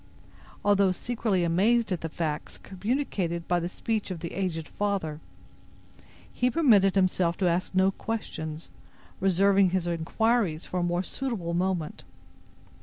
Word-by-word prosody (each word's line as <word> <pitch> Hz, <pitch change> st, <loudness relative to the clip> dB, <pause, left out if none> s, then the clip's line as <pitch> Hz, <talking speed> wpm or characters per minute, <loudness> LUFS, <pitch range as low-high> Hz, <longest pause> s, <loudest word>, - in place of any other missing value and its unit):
Although 200 Hz, -2 st, +4 dB
secretly 220 Hz, -4 st, -1 dB
amazed 205 Hz, +7 st, +2 dB
at 180 Hz, -, -1 dB
the 165 Hz, -, -3 dB
facts 155 Hz, -2 st, -4 dB
communicated 190 Hz, -5 st, -2 dB
by 175 Hz, 0 st, +2 dB
the 170 Hz, +1 st, -3 dB
speech 215 Hz, +2 st, -2 dB
of 180 Hz, -3 st, -4 dB
the 170 Hz, -, -5 dB
aged 170 Hz, -5 st, -2 dB
father, 195 Hz, -7 st, -2 dB, 1.1 s
he 250 Hz, -, +1 dB
permitted 220 Hz, -, +4 dB
himself 185 Hz, -3 st, +2 dB
to 185 Hz, -, +1 dB
ask 175 Hz, +2 st, 0 dB
no 190 Hz, +1 st, +4 dB
questions, 160 Hz, -8 st, -5 dB, 0.5 s
reserving 195 Hz, +1 st, +4 dB
his 185 Hz, -1 st, 0 dB
inquiries 175 Hz, +1 st, 0 dB
for 180 Hz, -, -3 dB
a -, -, 0 dB
more 175 Hz, +1 st, 0 dB
suitable 210 Hz, -9 st, -3 dB
moment. 175 Hz, -3 st, -1 dB
185 Hz, 135 wpm, -27 LUFS, 170-205 Hz, 1.1 s, Although